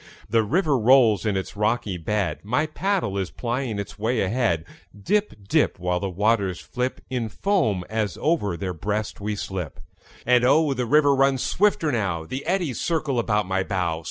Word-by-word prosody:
The 115 +2 +3
river 145 - +1
rolls 115 -2 +5
in 100 -2 +1
its 95 - -5
rocky 105 -1 0
bed; 90 -2 -1
My 125 +9 +1
paddle 155 - -1
is 95 - -2
plying 120 -2 -3
its 100 0 -6
way 115 +3 0
ahead; 100 -5 0 0.3
Dip, 190 - -1
dip, - - +2
While 90 0 -1
the 100 - -3
waters 100 -1 +1
flip 125 0 -3
In 120 -3 -2
foam 140 - 0
as 110 -3 -2
over 125 - 0
their 90 +1 -3
breast 105 +5 -3
we 105 +1 -2
slip. 95 -6 -5 0.5
And 125 0 +4
oh, 145 +3 +4
the 125 -2 -2
river 145 +1 +5
runs 135 -1 +2
swifter 205 -5 +2
now; 95 - -1
The 130 +11 -5
eddies 175 -8 -1
circle 155 -6 0
about 105 -3 +1
my 95 +1 0
bow. 90 -4 -1
110 Hz, 175 wpm, -24 LUFS, 100-135 Hz, 0.5 s, rolls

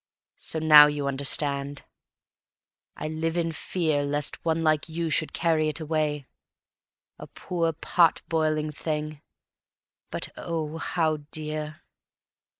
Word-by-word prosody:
So - - -3
now 155 -2 +9
you 145 -1 -2
understand. 140 0 0 1.1
I - - -4
live 160 +2 -2
in 165 -1 0
fear 160 -2 -1
Lest 145 0 -2
one 165 0 0
like 155 0 +1
you 165 0 -3
should 155 - +1
carry 160 -2 +1
it 155 - -3
away; 155 -2 -1 0.9
A - - -9
poor, 170 -2 -2
pot 165 +1 +2
boiling 155 -1 0
thing, 150 -1 -4 0.9
but - - -1
oh, 160 -1 -4
how 160 -3 0
dear! 155 0 -5
155 Hz, 120 wpm, -26 LUFS, 150-165 Hz, 1.1 s, now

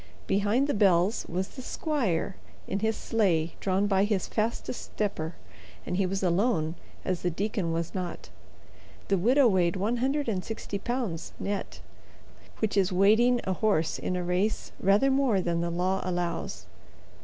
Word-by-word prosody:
Behind 205 +7 +2
the 290 - 0
bells 195 0 +3
was 185 +2 -2
the 260 - -9
squire 235 - -1 0.3
in 195 - -1
his 220 +1 0
sleigh 175 -8 +1
drawn 195 +1 +1
by 195 -1 +3
his 205 -3 0
fastest 230 +2 -2
stepper, 175 -6 -3 0.5
and 180 - -2
he 190 0 +2
was 195 +1 -2
alone, 175 -3 +2 0.3
as 185 -2 -1
the 180 - +1
deacon 195 0 -2
was 165 0 -2
not. 180 - -5 0.8
The 195 - +3
widow 255 +7 +5
weighed 180 -4 +2
one 210 +6 0
hundred 270 +3 0
and 190 -5 -1
sixty 210 -2 -5
pounds, 235 -7 -3
net—which 205 +1 -6
is 195 -1 +3
weighting 220 +6 +4
a 190 - 0
horse 185 -5 +1
in 185 - -2
a 180 - -1
race 180 +5 -1
rather 200 +8 +4
more 265 -7 +3
than 170 -2 0
the 170 - -1
law 185 +3 0
allows. 175 -1 -3
195 Hz, 155 wpm, -28 LUFS, 180-220 Hz, 0.8 s, widow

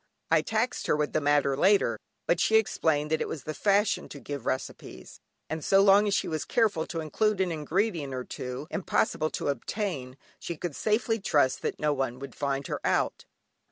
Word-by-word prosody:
I - - +5
taxed 225 +3 -1
her - - +3
with 150 0 -1
the 155 - +1
matter 145 -1 +3
later, 195 +8 +3 0.3
but - - +2
she 220 - +3
explained 160 -8 +2
that 160 - +1
it - - -1
was 150 -5 -6
the 155 - -4
fashion 205 +4 +1
to 145 - -9
give 140 -3 -6
recipes, 130 - -5 0.3
and 160 -1 -4
so 195 - +4
long 200 +1 +6
as 200 - +2
she - - 0
was 155 -3 -2
careful 205 - +1
to 165 -2 -4
include 210 +6 0
an 185 -2 +1
ingredient 165 -1 -1
or 125 - -3
two, 125 +3 -6
impossible 160 -3 0
to - - -3
obtain, 140 - -3 0.2
she 170 - -5
could 160 -2 -4
safely 225 +1 +1
trust 145 -9 +2
that - - -3
no 150 -1 +2
one 130 -3 -2
would 135 -1 -8
find 140 -1 -2
her - - -4
out. - - 0
155 Hz, 195 wpm, -28 LUFS, 140-200 Hz, 0.3 s, long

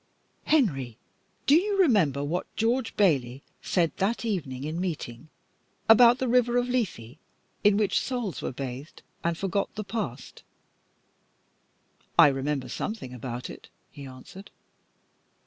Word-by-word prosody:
"Henry, 135 - +1 0.5
do 280 - +5
you 395 +4 +2
remember 185 - +3
what 165 +5 -2
George 230 +2 0
Bayley 135 -9 +2 0.2
said 170 -3 0
that 225 +5 0
night 195 -10 -1
in 150 +6 -4
meeting, 155 -6 -5 0.6
about 235 +2 +7
the 260 - -1
river 245 0 +3
of 245 0 +1
Lethe, 165 - -3 0.4
in 205 -1 +5
which, 205 -3 +2
souls 235 - -3
were - - -3
bathed 135 +3 -7 0.2
and 170 -1 0
forgot 195 +2 -2
the 215 - -4
past?" 195 - -5 1.8
"I - - +9
remember 135 -1 -2
something 130 - -5
about 125 0 -5
it," - - -11 0.2
he 140 -1 -10
answered. 130 +10 -12
180 Hz, 130 wpm, -27 LUFS, -, 1.8 s, I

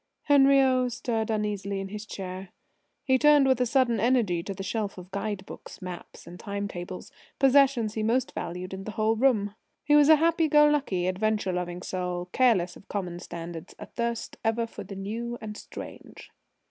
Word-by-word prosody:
Henriot 270 -3 +4
stirred 225 -1 -2
uneasily 205 -2 -2
in 195 0 -5
his 210 +1 -7
chair. 185 -1 -6 0.5
He 260 -1 +3
turned 295 -1 +6
with 260 -1 +3
sudden 250 -4 +2
energy 225 -7 +2
to 195 - -5
the 195 - -6
shelf 205 0 -3
of 180 +1 -11
guide 200 -1 -3
books, - - -11
maps 180 -2 -9
and 175 +1 -11
time 200 -1 -4
tables 180 -1 -7 0.3
possessions 270 -5 +4
he 220 - -2
most 230 +4 +1
valued 180 +2 -5
in 190 0 -6
the 215 - -6
whole 220 +1 +1
room. 220 -5 +2 0.3
He 295 0 +4
was 295 0 +6
a 315 - +10
happy 325 +1 +2
go 295 0 +6
lucky, 270 -12 0
adventure 195 +1 0
loving 180 0 -4
soul, 180 -1 -3
careless 200 -9 +3
of - - -16
common 180 -4 -4
standards, 170 -2 -8
athirst 235 -1 -4
ever 225 +1 +1
for 230 - -9
the 195 - -9
new 230 +5 -4
and 215 -1 -7
strange. - - -10
215 Hz, 175 wpm, -27 LUFS, 185-255 Hz, 0.5 s, a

